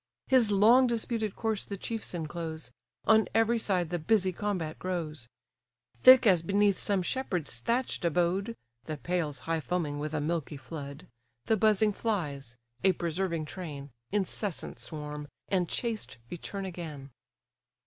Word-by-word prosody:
His 245 Hz, -5 st, +4 dB
long 230 Hz, +6 st, +6 dB
disputed 225 Hz, -3 st, -1 dB
corse 220 Hz, -3 st, -1 dB
the 200 Hz, -, -5 dB
chiefs 225 Hz, -1 st, -4 dB
enclose, 160 Hz, -3 st, -5 dB, 0.3 s
On 220 Hz, -1 st, +5 dB
every 225 Hz, +1 st, +3 dB
side 180 Hz, -6 st, 0 dB
the 175 Hz, -, -1 dB
busy 190 Hz, +2 st, +2 dB
combat 180 Hz, -5 st, -3 dB
grows; 160 Hz, -9 st, -4 dB, 0.7 s
Thick 255 Hz, -1 st, +9 dB
as 185 Hz, -6 st, +5 dB
beneath 200 Hz, +3 st, +2 dB
some 200 Hz, -3 st, +1 dB
shepherd's 180 Hz, -, -2 dB
thatch'd 235 Hz, -, -1 dB
abode 180 Hz, +6 st, +1 dB, 0.3 s
(The 155 Hz, -1 st, -4 dB
pails 155 Hz, -5 st, -2 dB
high 165 Hz, 0 st, -1 dB
foaming 155 Hz, -3 st, -2 dB
with 150 Hz, +1 st, -3 dB
a -, -, +1 dB
milky 155 Hz, -1 st, -2 dB
flood) 140 Hz, +3 st, -8 dB, 0.4 s
The 220 Hz, -, +3 dB
buzzing 215 Hz, 0 st, +3 dB
flies, 145 Hz, -, -3 dB, 0.3 s
a 190 Hz, -1 st, +5 dB
persevering 170 Hz, -1 st, -2 dB
train, 150 Hz, -5 st, -7 dB, 0.2 s
Incessant 200 Hz, -2 st, -2 dB
swarm, 150 Hz, -2 st, -6 dB, 0.2 s
and 180 Hz, -3 st, +1 dB
chased 230 Hz, -, -3 dB
return 195 Hz, +3 st, -5 dB
again. 155 Hz, -7 st, -7 dB
180 Hz, 140 wpm, -30 LUFS, 155-210 Hz, 0.7 s, Thick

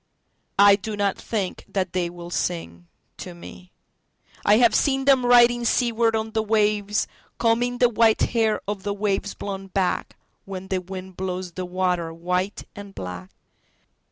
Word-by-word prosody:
I 200 Hz, 0 st, +7 dB
do 210 Hz, +1 st, -6 dB
not 200 Hz, -1 st, +1 dB
think 200 Hz, -5 st, -4 dB
that 190 Hz, -1 st, -2 dB
they 180 Hz, -2 st, 0 dB
will 175 Hz, 0 st, -10 dB
sing 85 Hz, -, -3 dB, 0.3 s
to 180 Hz, -, -8 dB
me.I 185 Hz, +3 st, -4 dB
have 235 Hz, -1 st, +5 dB
seen 270 Hz, -2 st, +2 dB
them 265 Hz, -3 st, +4 dB
riding 240 Hz, 0 st, +6 dB
seaward 230 Hz, -1 st, +2 dB
on 220 Hz, 0 st, -2 dB
the 220 Hz, 0 st, 0 dB
wavesCombing 220 Hz, +3 st, 0 dB
the 245 Hz, -, +5 dB
white 230 Hz, -1 st, +3 dB
hair 225 Hz, -2 st, +1 dB
of 205 Hz, -1 st, -3 dB
the 200 Hz, +1 st, -3 dB
waves 205 Hz, 0 st, -1 dB
blown 195 Hz, -1 st, -6 dB
backWhen 190 Hz, 0 st, -4 dB
the 185 Hz, -1 st, 0 dB
wind 185 Hz, 0 st, -9 dB
blows 185 Hz, -1 st, -4 dB
the 185 Hz, +1 st, -5 dB
water 180 Hz, -2 st, -1 dB
white 180 Hz, +4 st, -2 dB
and 200 Hz, -1 st, -10 dB
black. 90 Hz, 0 st, -7 dB
200 Hz, 145 wpm, -24 LUFS, 185-225 Hz, 0.3 s, I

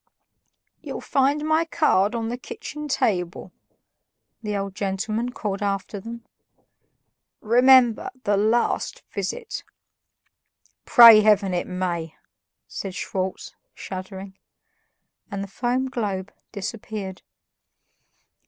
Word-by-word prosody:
"You'll -, -, -6 dB
find 285 Hz, +2 st, +1 dB
my 315 Hz, +1 st, +3 dB
card 240 Hz, -, +2 dB
on 225 Hz, -1 st, -2 dB
the 240 Hz, -, -3 dB
kitchen 300 Hz, +3 st, -7 dB
table," 180 Hz, -10 st, -1 dB, 0.9 s
the 210 Hz, -2 st, -2 dB
old 195 Hz, -1 st, -4 dB
gentleman 210 Hz, +4 st, -2 dB
called 205 Hz, -5 st, -4 dB
after 200 Hz, 0 st, -2 dB
them. 230 Hz, +3 st, -9 dB, 1.1 s
"Remember, 245 Hz, 0 st, +5 dB
the 205 Hz, -, +2 dB
LAST 220 Hz, +4 st, 0 dB
visit." 470 Hz, -2 st, -4 dB, 1.2 s
"Pray 230 Hz, -3 st, +9 dB
Heaven 205 Hz, -3 st, +3 dB
it 175 Hz, -, -1 dB
may!" 175 Hz, -3 st, -3 dB, 0.5 s
said 190 Hz, -2 st, -6 dB
Schwartz, 190 Hz, 0 st, -4 dB, 0.2 s
shuddering. 190 Hz, +1 st, -8 dB, 0.9 s
And 200 Hz, 0 st, -4 dB
the -, -, -7 dB
foam 250 Hz, +6 st, -1 dB
globe 205 Hz, -7 st, -3 dB, 0.2 s
disappeared. 205 Hz, -2 st, -6 dB
210 Hz, 95 wpm, -24 LUFS, 190-240 Hz, 1.2 s, Pray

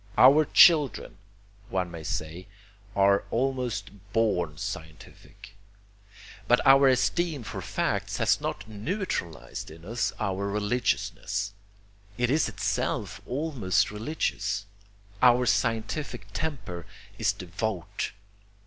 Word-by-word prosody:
Our 145 Hz, +4 st, +7 dB
children, 145 Hz, -, +5 dB, 0.5 s
one 95 Hz, -4 st, -1 dB
may 85 Hz, -1 st, -7 dB
say, 80 Hz, +5 st, -4 dB, 0.5 s
are 100 Hz, 0 st, +4 dB
almost 125 Hz, -2 st, -1 dB, 0.2 s
born 90 Hz, -9 st, +1 dB
scientific. 80 Hz, +6 st, -9 dB, 0.9 s
But -, -, +5 dB
our 135 Hz, 0 st, +7 dB
esteem 145 Hz, +3 st, +1 dB
for 105 Hz, -3 st, -6 dB
facts -, -, -2 dB
has -, -, +2 dB
not -, -, -4 dB
neutralized 105 Hz, -, -4 dB
in 80 Hz, +2 st, -13 dB
us 115 Hz, +4 st, -1 dB
all 100 Hz, -3 st, -1 dB
religiousness. 105 Hz, -1 st, -1 dB, 0.6 s
It 120 Hz, 0 st, +1 dB
is 155 Hz, +2 st, +2 dB
itself -, -, -2 dB
almost 130 Hz, -, 0 dB
religious. 105 Hz, -4 st, -2 dB, 0.6 s
Our 125 Hz, 0 st, +6 dB
scientific 115 Hz, 0 st, -1 dB
temper 110 Hz, -, -4 dB, 0.3 s
is -, -, +3 dB
devout. 95 Hz, -1 st, -4 dB
110 Hz, 100 wpm, -27 LUFS, 95-130 Hz, 0.9 s, Our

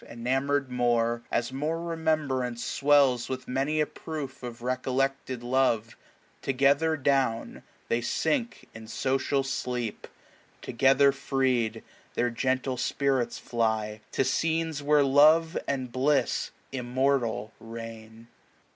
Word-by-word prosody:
Enamour 135 Hz, +4 st, 0 dB
d 130 Hz, -2 st, -12 dB
more, 120 Hz, -1 st, +1 dB
as 120 Hz, +2 st, -1 dB
more 155 Hz, +5 st, -2 dB
remembrance 155 Hz, -8 st, -1 dB
sw 140 Hz, -, -3 dB
ells 135 Hz, -4 st, +5 dB
With 130 Hz, -1 st, -5 dB
many 135 Hz, +4 st, 0 dB
a 150 Hz, -, +3 dB
proof 150 Hz, -4 st, -7 dB
of 120 Hz, -1 st, -8 dB
recollected 130 Hz, 0 st, -1 dB
love, 120 Hz, -3 st, +1 dB
^^7 -, -, -15 dB, 0.5 s
Together 140 Hz, +4 st, +2 dB
down 130 Hz, -4 st, 0 dB, 0.3 s
they 115 Hz, -, 0 dB
sink 240 Hz, -, -1 dB
in 110 Hz, 0 st, -10 dB
social 135 Hz, +4 st, 0 dB
sleep; 125 Hz, -4 st, -3 dB, 0.6 s
Together 135 Hz, +3 st, +4 dB
freed, 130 Hz, -4 st, 0 dB, 0.3 s
their 120 Hz, 0 st, +1 dB
gentle 130 Hz, +2 st, -1 dB
spirits 130 Hz, -1 st, 0 dB
fly 110 Hz, -2 st, -1 dB
To -, -, +2 dB
scenes 160 Hz, +3 st, 0 dB
where 145 Hz, 0 st, +4 dB
love 155 Hz, +5 st, +5 dB
and 130 Hz, -3 st, -2 dB
bliss 135 Hz, +4 st, +1 dB, 0.2 s
immortal 125 Hz, -4 st, 0 dB
reign. 115 Hz, 0 st, -9 dB
130 Hz, 120 wpm, -28 LUFS, 120-140 Hz, 0.6 s, ells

